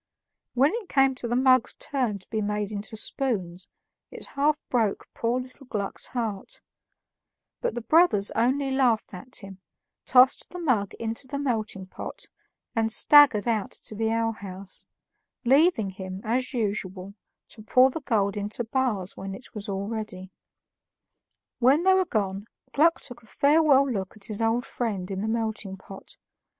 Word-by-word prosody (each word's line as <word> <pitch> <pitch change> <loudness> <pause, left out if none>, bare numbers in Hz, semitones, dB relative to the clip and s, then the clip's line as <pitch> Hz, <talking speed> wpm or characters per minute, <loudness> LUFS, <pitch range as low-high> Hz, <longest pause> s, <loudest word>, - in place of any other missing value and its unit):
When 275 +7 +4
it 460 -5 -5
came 270 -1 +4
to 250 -2 -5
the 240 - -1
mug's 255 -1 +3
turn 250 -7 -1
to 185 - -15
be 220 -1 -1
made 210 0 -2
into 210 +1 -5
spoons, 190 -9 -2 0.4
it - - -10
half 295 +2 +2
broke 225 -5 0
poor 235 +2 0
little 255 +1 -11
Gluck's 200 -4 -2
heart; 225 -6 -4 1.0
but 485 - -1
the 240 - -3
brothers 310 - +4
only 265 +4 +1
laughed 245 -6 +1
at 245 +8 -10
him, 195 -1 -11 0.5
tossed 255 0 +5
the 360 - -8
mug 250 - 0
into 230 +3 -4
the 280 - -4
melting 220 -8 -2
pot, 185 - -8 0.5
and 225 -1 +1
staggered 260 -4 +6
out 220 -4 0
to - - -9
the 220 +1 -1
alehouse, 200 -4 -3 0.6
leaving 270 - +4
him, 190 0 -7
as 250 +3 -1
usual, 200 -5 -3 0.4
to 220 - -11
pour 255 +4 +4
the 320 - -5
gold 205 -7 0
into 210 +3 -3
bars 225 -6 -1
when 195 0 -6
it 255 - -13
was 210 -1 -6
all 195 0 -3
ready. 210 -4 -6 1.3
When 270 +7 +4
they 380 0 +5
were 375 0 +3
gone, 200 - -2 0.3
Gluck 330 +3 +3
took 245 -3 -9
a 225 - -21
farewell 280 +1 +4
look 200 -5 -4
at 200 - -6
his 215 0 -3
old 225 +2 +1
friend 200 -6 -3
in 190 0 -3
the 215 - -2
melting 220 -3 -2
pot. 195 +1 -13
225 Hz, 160 wpm, -26 LUFS, 200-260 Hz, 1.3 s, staggered